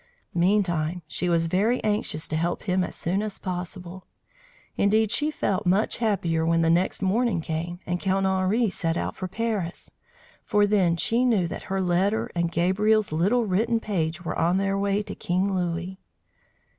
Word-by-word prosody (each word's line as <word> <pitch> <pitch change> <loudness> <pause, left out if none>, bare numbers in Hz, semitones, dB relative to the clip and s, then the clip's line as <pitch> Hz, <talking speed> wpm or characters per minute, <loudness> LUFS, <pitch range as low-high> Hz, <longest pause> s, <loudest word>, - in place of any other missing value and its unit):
Meantime 175 -2 +1
she 175 +3 -2
was 165 -1 +2
very 205 +9 +1
anxious 210 -7 -1
to 155 - -3
help 170 +2 -1
him 185 -1 +1
as - - -5
soon 185 +4 -1
as 215 -2 -5
possible. 180 0 -6 0.7
Indeed, 215 +1 +2
she 300 +1 +2
felt 200 -11 -1
much 195 +5 +2
happier 185 -8 0
when 165 0 +2
the 165 - +3
next 180 +3 +1
morning 210 0 +1
came, 165 +2 -4
and 175 0 -2
Count 195 0 0
Henri 190 +5 +2
set 165 -3 -2
out - - -3
for 185 - -4
Paris; 210 -4 -3 0.5
for 205 0 +3
then 190 -5 +2
she 230 +8 +1
knew 225 -8 +3
that - - -6
her 195 0 0
letter 190 +4 +1
and 170 -1 -1
Gabriel's 205 +5 +2
little 200 +10 +2
written 225 +4 +1
page 175 -5 -2
were - - -2
on 170 +3 +2
their 195 0 0
way 200 +1 0
to 205 - -7
King 185 +3 -1
Louis. 180 +1 -3
185 Hz, 170 wpm, -25 LUFS, 170-210 Hz, 0.7 s, the